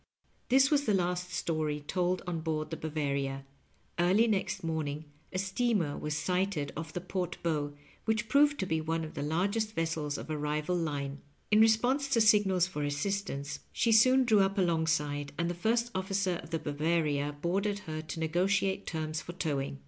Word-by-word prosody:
This 270 +3 +5
was 290 -1 +3
the 210 - +3
last 180 0 -1
story 155 -4 -1
told 180 +4 -1
on 175 -3 -2
board 155 -1 -2
the - - -2
Baf>aTia. 140 -3 -2 0.6
Early 185 +6 +4
next 210 -6 -1
morning 155 -2 -2 0.3
a 185 - -3
steamer 195 -4 0
was 150 0 -3
sighted 180 -3 -1
off 160 0 -5
the 180 - -3
port 180 -1 -3
bow, 150 -3 -1 0.3
which 220 0 0
proved 285 +4 +4
to - - 0
be 160 -3 0
one 165 +1 -1
of 155 - -7
the - - -4
largest 200 +9 0
vessels 160 -3 -1
of - - -7
a 155 - -1
rival 150 +3 -1
line. 145 -4 -3 0.3
In 215 +1 +6
response 245 +6 +3
to 275 -4 +2
signals 205 -5 +4
for 180 -5 -5
assistance 145 -1 -2
she 230 - +1
soon 255 +4 +6
drew 220 -3 +4
np 195 0 +2
alongside, 160 -5 0
and 170 0 0
the - - -2
first 230 +6 0
ofQcer 190 -1 -1
of - - -12
the 165 - -1
Bavaria 150 -1 0
boarded 195 +5 0
her 155 -1 -4
to 155 +1 -7
negotiate 190 +4 +1
terms 155 -1 -3
for 175 - -8
towing. 140 - -2
170 Hz, 180 wpm, -31 LUFS, 155-200 Hz, 0.6 s, In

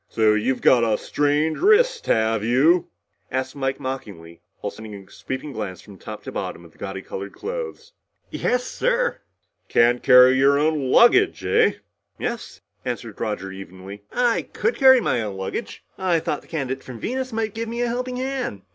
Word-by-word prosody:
"So 110 -1 +3
you've 110 +5 0
got 120 -2 +5
a 110 -2 +2
strained 150 +2 0
wrist, 475 +4 +3
have 110 -1 +2
you?" 145 +10 +3 0.4
asked 130 +1 -3
Mike 135 -1 -2
mockingly 100 -11 -7 0.2
while - - -4
sending 110 -1 -10
a 100 -1 -13
sweeping 130 +3 -6
glance 105 -6 -5
from 100 -3 -14
top - - -8
to - - -7
bottom 85 - -5
of 85 - -16
the - - -27
gaudy 95 -1 -6
colored 100 +1 -7
clothes. 480 +1 -6 0.4
"Yes, 250 0 0
sir." - - -1 0.5
"Can't 120 +1 +3
carry 125 0 +7
your 140 +1 +5
own 150 -3 +1
luggage, - - +5
eh?" - - +3 0.4
"Yes," - - -5 0.2
answered 120 -3 -5
Roger 105 -3 -3
evenly. 95 +1 -10
"I 240 -2 +2
could 460 - 0
carry 260 -2 +7
my 120 - 0
own 105 -3 -5
luggage. 95 0 -5 0.2
I 180 -3 +2
thought 150 - -3
the - - -22
candidate 135 -4 -4
from 125 -3 -9
Venus 255 - -3
might 220 -2 -2
give 230 0 -4
me 235 +1 -2
a - - 0
helping 250 +1 -3
hand. 255 - -3
130 Hz, 175 wpm, -23 LUFS, -, 0.5 s, carry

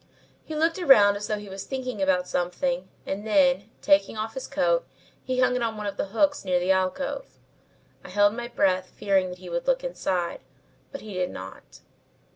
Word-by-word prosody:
He 315 - -7
looked 325 +4 +1
around 210 - +6
as 205 +1 -4
though 215 - -1
he 205 0 -9
was 195 0 -7
thinking 255 -5 -4
about 185 -1 +2
something 260 +10 -1 0.2
and 195 +2 -4
then, 195 -1 +3
taking 295 -6 +3
off 220 +1 -3
his 265 - -6
coat, 300 - +1 0.4
he 255 -1 0
hung 255 0 +3
it 250 - -1
on 225 -2 -1
one 210 - -5
of 200 - -3
the - - -2
hooks 290 +8 +1
near 180 -2 +1
the 180 +2 +1
alcove. 190 - -1 0.7
I - - -11
held 205 +2 +4
my 240 +1 -5
breath 185 -6 +1
fearing 195 -2 +1
that 180 - -8
he 180 - -12
would - - -3
look - - +2
inside, 185 - -2 0.5
but 280 - -7
he 215 -2 -9
did 180 -1 -1
not. 95 +1 -10
210 Hz, 200 wpm, -26 LUFS, 190-270 Hz, 0.7 s, around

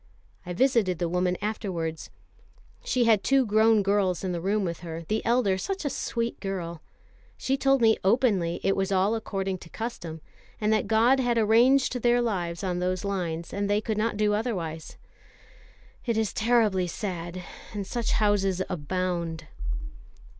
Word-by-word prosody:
I 180 - -3
visited 220 -5 +2
the 175 - -1
woman 180 +1 0
afterwards. 175 -7 -3 0.7
She 250 - +1
had 220 -4 +4
two 270 -1 +3
grown 220 0 +4
girls 195 -3 +1
in 185 - -1
the 170 -1 -3
room 200 +2 0
with 170 -2 -3
her, 165 -1 -6
the 215 +7 -2
elder 230 -5 +2
such 390 - -3
a 285 - 0
sweet 235 -1 -2
girl. 175 -5 -4 0.6
She 265 - 0
told 270 -1 +2
me 220 -1 +5
openly 195 -6 +2
it 195 - +2
was 195 0 -1
all 195 +3 +2
according 195 -4 -3
to 165 - -13
custom, 175 -9 -6 0.4
and 215 0 +2
that 215 - +1
God 230 +5 +4
had 245 -2 +1
arranged 245 +4 +4
their 240 +1 +4
lives 180 -8 -2
on 180 -2 -1
those 185 +1 -1
lines, 170 -4 -3
and 200 0 -1
they 205 0 +3
could 220 0 -2
not 220 -1 0
do 210 0 +2
otherwise. 180 -8 -3 1.1
It 230 -2 +1
is 220 -2 0
terribly 220 -5 +2
sad, 175 -1 -5 0.3
and 205 -2 -4
such 235 +3 -2
houses 200 -3 +2
abound." 170 -1 -2
200 Hz, 160 wpm, -27 LUFS, 180-225 Hz, 1.1 s, me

